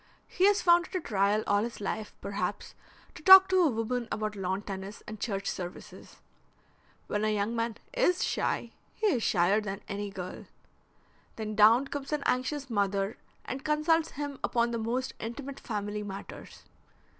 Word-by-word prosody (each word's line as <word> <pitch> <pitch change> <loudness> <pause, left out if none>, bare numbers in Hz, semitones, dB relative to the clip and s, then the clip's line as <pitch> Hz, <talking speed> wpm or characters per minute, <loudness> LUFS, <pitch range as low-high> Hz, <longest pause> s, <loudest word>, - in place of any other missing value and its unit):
He 375 +2 +3
has 410 0 +3
found 345 0 +5
it - - -10
a - - +2
trial 205 - +1
all 205 0 +2
his 235 +2 -4
life, 210 +1 -4
perhaps, 200 +1 -4 0.4
to - - -12
talk 380 +3 +10
to 375 -1 +4
a 330 - +4
woman 235 0 -2
about 215 -1 -2
lawn 190 +1 -2
tennis 195 +1 -7
and 215 0 -7
church 195 -4 -3
services. 175 -1 -7 0.8
When 210 0 -2
a 215 - +2
young 210 +2 -1
man 230 -1 -2 0.2
is 435 -8 +2
shy - - -1 0.2
he 440 - -2
is 310 - +2
shyer 195 +2 +3
than 200 -1 -5
any 205 0 -4
girl. 185 -2 -7 0.9
Then 215 -1 -4
down 225 +5 +6
comes 285 0 -5
an 300 -2 -1
anxious 275 +3 0
mother 200 -2 -1 0.3
and 265 +1 -5
consults 310 +2 +1
him 285 -1 -5
upon 235 0 +1
the 235 - -2
most 245 +4 -2
intimate 270 +5 -6
family 210 -2 -4
matters. 195 -1 -9
225 Hz, 165 wpm, -29 LUFS, 205-280 Hz, 0.9 s, talk